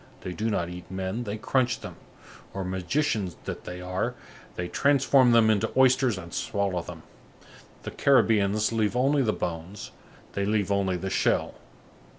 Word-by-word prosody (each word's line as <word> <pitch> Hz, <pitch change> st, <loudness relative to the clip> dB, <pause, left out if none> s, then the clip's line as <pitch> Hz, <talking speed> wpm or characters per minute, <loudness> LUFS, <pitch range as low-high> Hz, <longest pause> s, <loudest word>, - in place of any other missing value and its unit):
They 90 Hz, -, -5 dB
do 110 Hz, +4 st, -2 dB
not 85 Hz, -5 st, -1 dB
eat 90 Hz, 0 st, -9 dB
men, 95 Hz, +5 st, -3 dB
they 105 Hz, 0 st, -4 dB
crunch 120 Hz, +2 st, 0 dB
them; -, -, -8 dB, 0.6 s
or, 95 Hz, -, -2 dB
magicians 95 Hz, -, -1 dB
that -, -, -6 dB
they 90 Hz, 0 st, -7 dB
are, 90 Hz, +1 st, -2 dB, 0.4 s
they 90 Hz, -, -3 dB
transform 135 Hz, +1 st, +4 dB
them 115 Hz, -2 st, +5 dB
into 105 Hz, -2 st, 0 dB
oysters 130 Hz, -4 st, +4 dB
and 85 Hz, -2 st, -9 dB
swallow 100 Hz, -3 st, -1 dB
them. -, -, -10 dB, 0.8 s
The -, -, -5 dB
Caribbeans 110 Hz, -6 st, +3 dB
leave 110 Hz, -1 st, 0 dB
only 135 Hz, +3 st, +3 dB
the 115 Hz, -5 st, +2 dB
bones, 85 Hz, +2 st, -5 dB, 0.4 s
they 100 Hz, -, -1 dB
leave 100 Hz, -1 st, 0 dB
only 95 Hz, -2 st, +1 dB
the 95 Hz, +2 st, -4 dB
shell. -, -, +1 dB
105 Hz, 160 wpm, -26 LUFS, 95-120 Hz, 0.8 s, them